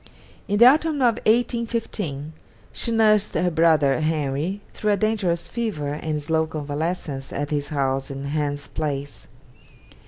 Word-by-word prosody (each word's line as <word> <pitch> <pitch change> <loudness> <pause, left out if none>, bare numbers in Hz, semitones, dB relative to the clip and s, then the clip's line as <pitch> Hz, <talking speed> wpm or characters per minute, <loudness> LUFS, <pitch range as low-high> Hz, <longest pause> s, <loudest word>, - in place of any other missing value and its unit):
In 205 - +1
the 235 - +8
autumn 310 +4 +5
of 240 -5 +2
1815 225 - 0 0.4
she 235 - -2
nursed 215 -2 +3
her 180 0 +1
brother 160 -4 +3
Henry 155 +4 -1
through 210 -1 0
a - - +1
dangerous 200 -6 0
fever 195 -12 -3
and 150 0 -3
slow 160 +2 0
convalescence 150 -1 -4
at 145 +1 -3
his 145 -1 -1
house 135 -2 -1
in 135 0 -6
Hans 145 0 -2
Place. 145 -2 -4
160 Hz, 135 wpm, -23 LUFS, 145-215 Hz, 0.4 s, the